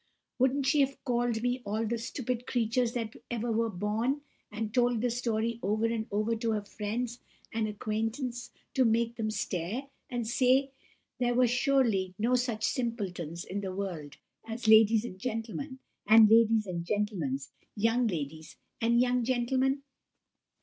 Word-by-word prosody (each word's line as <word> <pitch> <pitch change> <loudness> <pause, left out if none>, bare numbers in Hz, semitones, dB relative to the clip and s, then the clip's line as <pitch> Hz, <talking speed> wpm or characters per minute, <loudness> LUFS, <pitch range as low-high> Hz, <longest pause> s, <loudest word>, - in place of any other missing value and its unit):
Wouldn't 265 +2 +2
she 285 +3 +3
have 275 0 +2
called 240 -3 0
me 245 +1 0
all 215 +2 -1
the 230 +1 -1
stupid 250 +1 -4
creatures 240 0 +1
that 230 -2 -3
ever 235 0 -2
were 225 +1 +1
born, 220 +8 -1 0.3
and 215 0 -4
told 245 -1 +3
the 245 +1 0
story 235 -1 -1
over 215 +3 +1
and 230 -1 -1
over 215 +3 0
to 230 - -3
all 225 - +2
her 205 -1 -3
friends 230 +4 -4 0.3
and 220 -1 0
acquaintance 225 +4 -3 0.2
to 265 - +4
make 230 0 +2
them 220 -2 -2
stare, 215 +6 -3 0.2
and 240 -3 -3
say 260 +3 +3 0.5
there 245 -1 +1
were 250 +1 +5
surely 240 -7 +2
no 230 +4 +1
such 240 -3 0
simpletons 185 - -2
in 200 +2 -4
the 190 -2 -4
world 170 -7 -5 0.3
as 225 +1 -5
ladies 220 0 +6
and 185 -5 -8
gentlemen, 240 +5 -4 0.3
and 220 0 +8
ladies' 225 -1 +5
and 175 -3 -4
gentlemen's 170 -9 -2 0.2
young 230 +3 +2
ladies 155 -4 -5 0.2
and 235 +1 +3
young 250 -1 +2
gentlemen? 260 +3 +1
230 Hz, 155 wpm, -30 LUFS, 210-245 Hz, 0.5 s, and